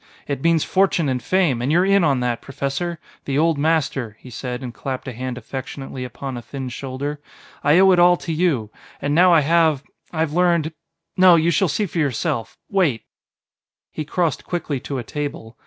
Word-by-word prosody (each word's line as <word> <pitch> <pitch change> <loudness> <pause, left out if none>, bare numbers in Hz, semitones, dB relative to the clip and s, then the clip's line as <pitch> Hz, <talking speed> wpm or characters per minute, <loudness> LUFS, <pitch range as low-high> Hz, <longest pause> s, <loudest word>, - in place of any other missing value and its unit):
It 140 -2 -3
means 165 -1 +3
fortune 190 -4 +2
and 125 -1 -1
fame, 160 -5 +1
and 130 +4 0
you're 175 +3 +4
in 195 -1 +4
on 140 -5 +2
that, 120 -1 -1
Professor. 140 +5 -3 0.3
The 135 -1 -1
old 160 -1 +2
master," 140 -8 0
he 125 - -12
said 125 +2 -5
and 125 -2 -6
clapped 130 +1 -5
a 130 - -4
hand 125 +1 -5
affectionately 130 +1 -6
upon 125 +2 -6
a - - -6
thin 130 +1 -6
shoulder; 140 +4 -5 0.4
"I 145 +3 +5
owe 190 +1 +6
it 180 - +4
all 175 0 +6
to 165 - -4
you. 150 -11 0 0.3
And 145 - -1
now 180 +3 +6
I 165 -2 +6
have 160 -2 +3 0.3
I 160 - -2
have 155 -2 0
learned.... 170 -2 +2 0.4
No, 185 -1 +7
you 165 +1 +3
shall 185 +4 +2
see 205 +7 0
for 170 -2 -4
yourself. 120 -5 -1
Wait 170 - +1 0.5
" - - -72
He 155 - -4
crossed 160 -1 -1
quickly 160 -6 -3
to 135 +2 -5
a 125 - -3
table. 140 -4 -5
145 Hz, 200 wpm, -21 LUFS, 130-170 Hz, 0.5 s, No